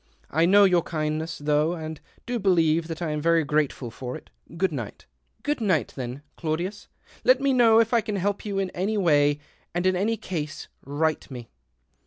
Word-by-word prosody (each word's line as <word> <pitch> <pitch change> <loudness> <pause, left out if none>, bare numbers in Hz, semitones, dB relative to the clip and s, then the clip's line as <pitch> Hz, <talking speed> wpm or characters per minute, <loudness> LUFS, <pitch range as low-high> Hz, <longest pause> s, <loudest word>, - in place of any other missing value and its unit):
I 165 +3 +3
know 200 +2 +7
your 180 -3 +5
kindness 155 0 -3
though, 150 +2 +1
and 160 -2 -7 0.2
do 245 0 -2
believe 165 -4 +2
that 165 +1 -5
I 160 - -1
am 150 0 -2
very 165 +1 +3
grateful 145 -4 -1
for 125 +2 -6
it. - - -18 0.3
Good 190 0 +1
night." 120 -8 -6 0.2
" - - -41
Good 295 -4 -1
night, 185 -9 +1
then, 130 +2 -6
Claudius. 175 +6 -3 0.4
Let 255 +1 +5
me 275 0 +2
know 230 -3 +6
if 230 +1 +2
I 235 - +4
can 215 -2 -4
help 200 +1 -1
you 200 -2 -3
in 195 -1 -1
any 200 +4 -1
way, 145 -6 +3 0.4
and 175 +1 0
in 185 0 +3
any 215 +5 0
case 155 -7 -5 0.2
write 155 +3 0
to - - -12
me." 120 -2 -8
165 Hz, 200 wpm, -25 LUFS, 150-200 Hz, 0.4 s, know